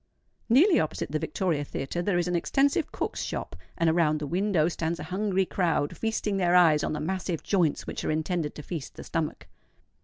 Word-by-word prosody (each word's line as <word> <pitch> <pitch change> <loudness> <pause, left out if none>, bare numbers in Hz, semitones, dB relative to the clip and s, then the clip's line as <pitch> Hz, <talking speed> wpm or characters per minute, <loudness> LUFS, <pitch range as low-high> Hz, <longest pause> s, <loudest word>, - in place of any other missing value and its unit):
Nearly 325 - +6
opposite 155 -2 -2
the 155 - 0
Victoria 160 -1 -1
Theatre 145 +4 -4
there 180 0 +1
is 175 0 0
an 180 - 0
extensive 280 - +1
cook's - - -3
shop; - - -4 0.2
and 165 - +2
around 160 -2 +3
the 150 - -4
window 175 0 +1
stands 170 0 -2
a - - -5
hungry 190 +2 0
crowd 165 -6 0
feasting 220 -2 -1
their 180 -2 +3
eyes 160 -4 +5
on - - -1
the 150 - -3
massive 175 +1 -2
joints 175 -7 +1
which - - -5
are - - -1
intended 160 0 -1
to 150 - -8
feast 160 -3 -6
the - - -8
stomach. 155 - -3
175 Hz, 195 wpm, -27 LUFS, 155-190 Hz, 0.2 s, Nearly